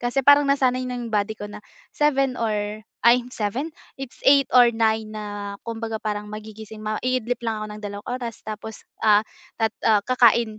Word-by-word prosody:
kasi 245 +2 0
parang 285 0 +8
nasanay 255 -2 +2
na 250 0 -4
body 215 0 -1
ko 205 - -5
na 210 0 -10 0.3
7 275 -3 +2
or 215 -1 -2 0.2
ay 245 +1 +7
7, 240 +7 -2 0.3
it's 270 -2 -7
8 275 -1 +6
or 245 -1 +7
9 220 -1 +1
na 205 -1 -5
kumbaga 225 -1 -4
parang 210 -1 -3
magigising 215 0 -9
maidlip 245 +3 -1
lang 220 -2 -2
ako - - -4
ng 210 - -9
2 205 0 -6
oras 245 -2 -4
tapos 215 0 -7 0.2
ah 210 -1 +6 0.9
kakain, 235 -3 +4
220 Hz, 160 wpm, -23 LUFS, 215-250 Hz, 0.9 s, parang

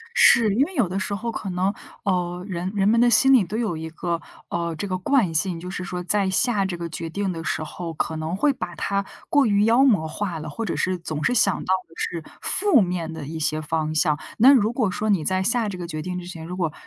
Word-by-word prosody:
是， 220 -4 +6
因 255 - +4
为 375 - -10
有 235 - +2
的 190 +2 -2
时 200 +2 -2
候 230 +3 -3
可 200 -3 -5
能， 185 +3 0 0.3
呃， 180 -2 -1
人 180 0 -3
人 195 0 +2
们 230 +1 +4
的 240 0 +5
心 265 +4 +5
里 250 -6 +6
都 190 +4 -6
有 220 -8 -1
一 160 0 -6
个， 170 0 -3 0.3
呃， 170 -1 -2
这 200 +6 -4
个 185 -1 -1
惯 210 -3 +2
性， 165 +2 0
就 180 - -7
是 185 0 -5
说 180 -1 -4
在 195 +1 +1
下 205 0 +1
这 185 -2 -3
个 170 0 -5
决 165 0 -5
定 195 +2 -2
的 165 -2 -6
时 155 - -2
候， 165 +1 -6
可 160 +1 -2
能 160 +3 -3
会 290 +9 +3
把 180 -10 -6
它 200 +3 -1 0.2
过 285 -2 +4
于 205 -2 +3
妖 235 +4 +5
魔 205 -12 +3
化 175 0 -4
了， 155 0 -6
或 225 +9 -4
者 185 - -2
是 185 0 0
总 155 -3 -5
是 245 - +2
想 205 -5 +2
到 190 - +1
的 165 - -20
是 165 -2 -3 0.2
负 385 - +3
面 175 -3 -2
的 160 -3 -7
一 160 +3 -6
些 155 0 0
方 155 0 -2
向。 150 -1 +2 0.2
那 260 +5 +8
如 230 -3 +3
果 225 -6 +1
说 215 +2 -2
你 185 -6 +2
在 185 +2 0
下 230 +1 +1
这 190 - -6
个 175 -1 -6
决 155 -1 -5
定 180 +3 -4
之 175 - -9
前， 165 -3 -8
如 180 +2 -6
果 165 -5 -1
185 Hz, 280 characters per minute, -23 LUFS, 165-210 Hz, 0.3 s, 那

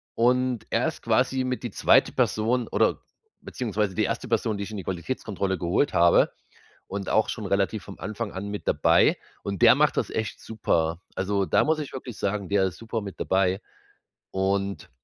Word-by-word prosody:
und 125 0 +2
er - - +1
ist - - -5
quasi 130 -1 +1
mit 125 0 -3
die - - -4
zweite - - +4
Person, 115 +3 +1
oder - - +1 0.4
beziehungsweise 105 -5 -2
die 110 - +2
erste 125 - -3
Person, 110 -2 0
die 100 - -3
ich 110 - -9
in 105 - -5
die 95 - -5
Qualitätskontrolle 95 0 -3
geholt 90 - +1
habe 85 0 +5 0.6
und 100 0 -5
auch 110 - +2
schon 105 -4 -4
relativ 100 +2 0
vom 100 - -10
Anfang 110 0 -4
an 95 +2 -5
mit 105 0 -6
dabei - - +4 0.3
und 100 -2 -4
der - - +9
macht - - +3
das - - 0
echt 110 -1 -3
super. 85 -6 -1 0.2
Also, 100 0 0
da - - +3
muss 160 +1 +1
ich 145 - -6
wirklich 125 -4 -7
sagen, 100 -1 -2
der 100 -1 +3
ist 90 - -5
super 115 0 -4
mit 100 -2 -8
dabei 95 +1 +1 0.7
und 100 +1 -1
100 Hz, 190 wpm, -26 LUFS, 95-115 Hz, 0.7 s, der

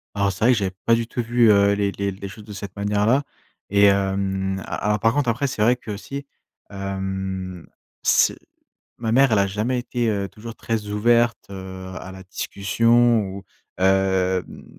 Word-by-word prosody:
Alors, 100 -1 +1
c'est 100 - -1
vrai 125 - +6
que - - 0
j'avais 95 -3 -2
pas 115 - +5
du 115 0 -2
tout 120 - -3
vu, 120 -1 +4
heu, 100 0 +5
les 100 -1 0
les 100 0 -2
les 100 +1 -7
choses 105 +2 -11
de 105 - -10
cette 100 -1 -8
manière-là 105 +6 +1 0.5
et 100 +1 +5
hem, 95 -1 +1
a - - -4
alors, 105 0 +2
par 115 +2 +3
contre, 140 -3 +1
après, 130 +5 0
c'est 125 -5 -4
vrai 120 +3 +5
qu'aussi, 125 +5 -7 0.4
hem, 95 -2 -4 0.3
c'est - - +3 0.6
ma 115 -1 -2
mère, 135 0 +5
elle 105 - +4
a 100 - +3
jamais 110 +6 -1
été, 120 -1 -2
heu, 100 -2 -1
toujours 115 +2 -10
très 110 -2 -3
ouverte, 115 +3 +2
heu, 95 -1 -8
à 95 - -9
la 95 - -10
discussion 115 +5 +2
ou, 100 0 -7 0.3
hem, 95 - +1
heu 95 -1 +2
heu, - - -12
100 Hz, 190 wpm, -22 LUFS, 95-115 Hz, 0.6 s, vrai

